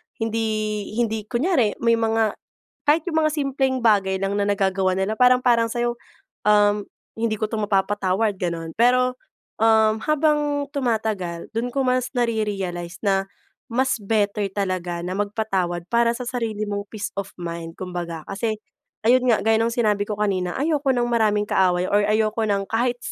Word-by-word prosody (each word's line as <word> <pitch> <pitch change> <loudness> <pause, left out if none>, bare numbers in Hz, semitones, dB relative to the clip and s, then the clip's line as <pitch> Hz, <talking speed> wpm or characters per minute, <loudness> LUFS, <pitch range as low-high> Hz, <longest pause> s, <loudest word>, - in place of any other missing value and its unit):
hindi, 215 -2 -2
hindi, 220 -2 -1
kunyari 250 - +1
may 230 0 +4
mga 225 -1 +1 0.5
kahit 305 +2 +4
yung 320 -1 +1
mga 310 - +2
simpleng 270 -2 0
bagay 200 -4 +3
lang 195 +1 -1
na 200 - +1
nagagawa 190 -2 +1
nila, 190 +3 -1
parang 250 0 +6
parang 235 -2 +4
sayo, 240 0 -1 0.5
um, 205 0 +4 0.4
hindi 225 -1 0
ko 215 0 -2
to 220 - -2
mapapatawad 205 0 +1
ganon. 165 -2 -3
Pero 250 +1 +3 0.4
um 220 -1 +4
habang 295 -1 +1
tumatagal, 220 - -2
dun 235 +2 -1
ko 275 +2 -1
mas 255 0 +1
nare-realize 195 -7 -2
na 195 -1 +2 0.5
mas 260 +3 +1
better 205 0 0
talaga 185 -3 -2
na 180 - -3
magpatawad 195 -5 -1
para 235 +1 +3
sa 250 - -5
sarili 225 -4 -2
mong 200 0 -3
peace 210 -2 -5
of 200 0 -4
mind, 170 -1 -5
kumbaga 175 -3 -5
kasi 215 +2 -2 0.5
ayon 250 +1 +5
nga 225 - +5
gayong 225 +1 +2
sinabi 210 -4 +1
ko 210 - -3
kanina, 185 -4 0
ayoko 290 0 0
ng 245 -1 +1
maraming 215 -3 +2
kaaway, 180 -1 +2
or 205 - +3
ayoko 215 +1 +1
ng 200 -2 0
kahit 240 +2 0
215 Hz, 155 wpm, -23 LUFS, 195-240 Hz, 0.5 s, parang